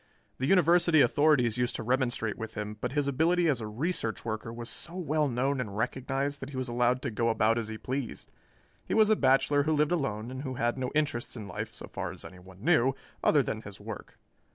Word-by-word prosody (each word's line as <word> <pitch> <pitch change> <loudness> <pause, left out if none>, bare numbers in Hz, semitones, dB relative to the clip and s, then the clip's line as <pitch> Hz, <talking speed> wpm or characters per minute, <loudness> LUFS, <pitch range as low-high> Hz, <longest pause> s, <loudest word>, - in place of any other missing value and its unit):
The 130 - 0
University 170 -2 +5
authorities 125 -3 +3
used 125 0 0
to - - -4
remonstrate 120 -3 0
with 110 0 -7
him, 105 0 -4
but - - -2
his 145 -1 +1
ability 165 +5 +2
as 135 -7 +1
a 110 - -4
research 115 +1 -2
worker 110 0 -3
was 120 0 -7
so 170 +7 -6
well 155 -4 0
known 130 +2 0
and 105 -4 -6
recognized 135 +4 -1
that 135 - -7
he 135 - -7
was 130 0 -2
allowed 125 +1 +1
to 130 - -2
go 115 +2 +1
about 115 +1 +2
as 115 - -3
he 110 0 -5
pleased. 130 +1 -5 0.5
He - - -2
was 220 -1 +5
a - - +6
bachelor 140 -1 +3
who 155 +2 +1
lived 150 +1 +2
alone 115 -8 -1
and 130 0 -5
who 130 -2 -4
had 120 0 0
no 130 -1 -2
interests 145 -6 -1
in 105 -3 -7
life, 95 - -5
so - - -8
far - - -4
as - - -10
anyone 95 +1 -13
knew, 135 -6 +4 0.3
other - - +4
than - - -3
his - - -10
work. - - -8
130 Hz, 225 wpm, -29 LUFS, 115-150 Hz, 0.5 s, a